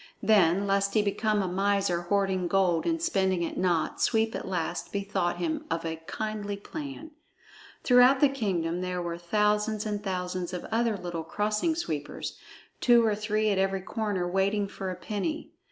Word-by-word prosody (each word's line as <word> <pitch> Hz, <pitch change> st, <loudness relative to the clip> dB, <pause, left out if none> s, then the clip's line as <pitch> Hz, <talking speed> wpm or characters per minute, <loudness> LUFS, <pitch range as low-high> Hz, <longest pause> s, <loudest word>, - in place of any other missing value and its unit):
Then, 195 Hz, -3 st, +4 dB
lest 200 Hz, +1 st, +1 dB
he 215 Hz, -, +4 dB
become 210 Hz, 0 st, +1 dB
a -, -, -1 dB
miser 195 Hz, -1 st, +1 dB
hoarding 190 Hz, 0 st, 0 dB
gold 180 Hz, -3 st, +2 dB
and 330 Hz, -1 st, +1 dB
spending 190 Hz, -, +1 dB
it 165 Hz, -, -3 dB
not, 175 Hz, -3 st, 0 dB
Sweep 225 Hz, -1 st, +2 dB
at -, -, -5 dB
last 175 Hz, -2 st, -3 dB
bethought 200 Hz, -3 st, -1 dB
him 170 Hz, -3 st, -2 dB
of 165 Hz, 0 st, -2 dB
a 160 Hz, 0 st, -3 dB
kindly 210 Hz, -2 st, -3 dB
plan. 295 Hz, +7 st, -7 dB, 0.7 s
Throughout 250 Hz, +1 st, +6 dB
the 290 Hz, -, +6 dB
kingdom 180 Hz, -10 st, -1 dB
there 180 Hz, 0 st, -2 dB
were 170 Hz, -1 st, -4 dB
thousands 210 Hz, +3 st, +1 dB
and 205 Hz, -1 st, -3 dB
thousands 180 Hz, -2 st, -3 dB
of 180 Hz, -, -4 dB
other 230 Hz, -2 st, +1 dB
little 175 Hz, -3 st, -5 dB
Crossing 210 Hz, -, 0 dB
Sweepers, 155 Hz, -, -4 dB, 0.4 s
two 240 Hz, -2 st, +5 dB
or 215 Hz, -, +2 dB
three 215 Hz, 0 st, 0 dB
at 195 Hz, -, +1 dB
every 195 Hz, 0 st, +1 dB
corner 200 Hz, -3 st, -2 dB
waiting 195 Hz, +3 st, +1 dB
for 195 Hz, -1 st, -5 dB
a 185 Hz, -, -3 dB
penny. 215 Hz, -, -4 dB
200 Hz, 170 wpm, -28 LUFS, 180-215 Hz, 0.7 s, Throughout